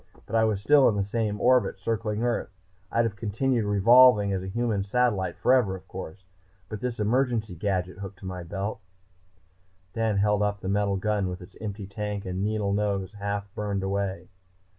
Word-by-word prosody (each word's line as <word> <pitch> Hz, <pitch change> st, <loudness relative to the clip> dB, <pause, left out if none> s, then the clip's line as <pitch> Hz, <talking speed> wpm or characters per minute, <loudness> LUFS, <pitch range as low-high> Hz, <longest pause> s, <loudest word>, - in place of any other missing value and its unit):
But 115 Hz, -, -5 dB
I 110 Hz, 0 st, +4 dB
was 110 Hz, -3 st, 0 dB
still 140 Hz, +6 st, +5 dB
in 105 Hz, -, -1 dB
the 100 Hz, -, +1 dB
same 105 Hz, 0 st, -2 dB
orbit 125 Hz, -4 st, +3 dB
circling 110 Hz, +2 st, -2 dB
Earth. 120 Hz, -1 st, -1 dB, 0.4 s
I'd 115 Hz, 0 st, +2 dB
have 110 Hz, -3 st, -2 dB
continued 115 Hz, +2 st, 0 dB
revolving 105 Hz, 0 st, +6 dB
as 95 Hz, -, -1 dB
a 95 Hz, -, -6 dB
human 110 Hz, 0 st, -1 dB
satellite 105 Hz, -2 st, 0 dB
forever, 125 Hz, -7 st, +3 dB
of 95 Hz, -, -12 dB
course, 95 Hz, +4 st, -8 dB, 0.4 s
but 105 Hz, -, -5 dB
for -, -, -24 dB
this 125 Hz, -2 st, -3 dB
emergency 115 Hz, -1 st, +1 dB
gadget 90 Hz, 0 st, -2 dB
hooked 100 Hz, -1 st, -7 dB
to 95 Hz, -, -12 dB
my 90 Hz, -1 st, -5 dB
belt." 100 Hz, +5 st, -4 dB, 1.1 s
Dan 110 Hz, -2 st, 0 dB
held 105 Hz, +1 st, +2 dB
up 105 Hz, 0 st, -1 dB
the -, -, -5 dB
metal 100 Hz, -1 st, +1 dB
gun 100 Hz, -1 st, 0 dB
with 90 Hz, 0 st, -5 dB
its 90 Hz, -, -13 dB
empty 105 Hz, -1 st, -5 dB
tank 105 Hz, 0 st, -4 dB
and 95 Hz, +1 st, -3 dB
needle 105 Hz, -1 st, 0 dB
nose 100 Hz, -2 st, -1 dB
half 100 Hz, -1 st, -3 dB
burned 100 Hz, -2 st, -2 dB
away. 95 Hz, -1 st, -2 dB
105 Hz, 185 wpm, -26 LUFS, 95-110 Hz, 1.1 s, revolving